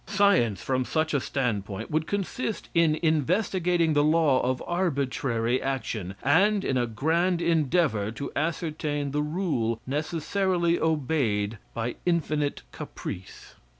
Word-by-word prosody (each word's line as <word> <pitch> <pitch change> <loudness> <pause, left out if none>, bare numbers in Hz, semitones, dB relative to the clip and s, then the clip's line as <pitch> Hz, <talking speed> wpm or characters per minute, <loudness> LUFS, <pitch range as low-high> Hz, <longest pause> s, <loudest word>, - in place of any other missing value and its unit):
Science, 190 - +3
from 130 -1 0
such 155 +4 -1
a 140 - +3
standpoint, 105 -8 -3
would 155 +1 0
consist 205 +3 -3
in 165 -2 +3
investigating 170 - +2
the 145 0 +3
law 155 -3 +3
of 125 0 -1
arbitrary 135 -8 0
action, 115 -8 -3
and 195 - +3
in 135 - 0
a 120 -1 +1
grand 165 - +1
endeavor 155 - +1
to 125 +6 -6
ascertain 150 -2 -2
the 150 +1 0
rule 150 -9 -1
necessarily 170 +4 0
obeyed 130 -9 0 0.2
by 115 +1 -2
infinite 150 -4 0
caprice. 90 - -8
150 Hz, 120 wpm, -27 LUFS, 125-170 Hz, 0.2 s, Science